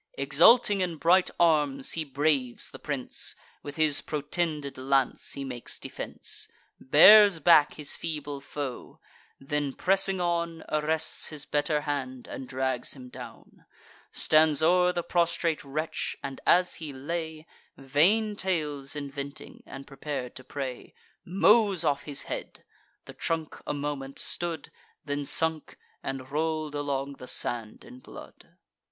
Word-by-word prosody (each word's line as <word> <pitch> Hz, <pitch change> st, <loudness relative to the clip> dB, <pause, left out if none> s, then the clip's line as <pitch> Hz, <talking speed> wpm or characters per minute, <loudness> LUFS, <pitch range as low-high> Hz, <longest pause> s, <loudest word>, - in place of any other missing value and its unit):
Exulting 220 Hz, -5 st, +5 dB
in 175 Hz, -2 st, -1 dB
bright 180 Hz, +4 st, +4 dB
arms, 150 Hz, -5 st, +2 dB
he 165 Hz, -, -2 dB
braves 140 Hz, -3 st, 0 dB
the -, -, -10 dB
prince: -, -, -2 dB, 0.3 s
With 145 Hz, 0 st, -8 dB
his 155 Hz, -2 st, +2 dB
protended 150 Hz, -2 st, -3 dB
lance 135 Hz, 0 st, 0 dB
he 140 Hz, -, -4 dB
makes 125 Hz, -3 st, -6 dB
defence; -, -, -5 dB, 0.3 s
Bears 200 Hz, +7 st, +8 dB
back 160 Hz, -3 st, +5 dB
his 150 Hz, -2 st, -1 dB
feeble 145 Hz, -3 st, -5 dB
foe; 140 Hz, -3 st, -7 dB, 0.4 s
then, 145 Hz, 0 st, -2 dB
pressing 195 Hz, +2 st, +3 dB
on, 170 Hz, -2 st, -1 dB
Arrests 155 Hz, +1 st, +1 dB
his 150 Hz, -2 st, -5 dB
better 150 Hz, +1 st, 0 dB
hand, 130 Hz, -4 st, -4 dB
and 130 Hz, -, -7 dB
drags 130 Hz, -1 st, -2 dB
him 125 Hz, -2 st, -11 dB
down; -, -, -12 dB, 0.5 s
Stands 155 Hz, -1 st, +3 dB
o'er 180 Hz, +2 st, +4 dB
the 175 Hz, -1 st, -3 dB
prostrate 170 Hz, -2 st, 0 dB
wretch, 155 Hz, +3 st, -3 dB
and, 135 Hz, -1 st, -6 dB
as 180 Hz, +1 st, +4 dB
he 155 Hz, -2 st, -5 dB
lay, 160 Hz, +3 st, -5 dB, 0.3 s
Vain 180 Hz, +11 st, +2 dB
tales 150 Hz, -8 st, -2 dB
inventing, 140 Hz, 0 st, -7 dB
and 135 Hz, +1 st, -9 dB
prepar'd 135 Hz, -2 st, -6 dB
to 130 Hz, -, -10 dB
pray, 130 Hz, -1 st, -6 dB, 0.3 s
Mows 200 Hz, 0 st, +3 dB
off 140 Hz, -1 st, 0 dB
his 145 Hz, -2 st, -3 dB
head: -, -, -7 dB, 0.4 s
the -, -, -10 dB
trunk 160 Hz, -2 st, -3 dB
a -, -, -1 dB
moment 140 Hz, -2 st, -5 dB
stood, 170 Hz, -3 st, -3 dB, 0.3 s
Then 145 Hz, -1 st, -3 dB
sunk, 160 Hz, -2 st, 0 dB, 0.2 s
and 135 Hz, 0 st, -6 dB
roll'd 155 Hz, 0 st, -2 dB
along 140 Hz, -1 st, -3 dB
the 125 Hz, -, -9 dB
sand 115 Hz, -4 st, -2 dB
in 250 Hz, +3 st, -13 dB
blood. -, -, -14 dB
150 Hz, 135 wpm, -27 LUFS, 140-165 Hz, 0.5 s, Bears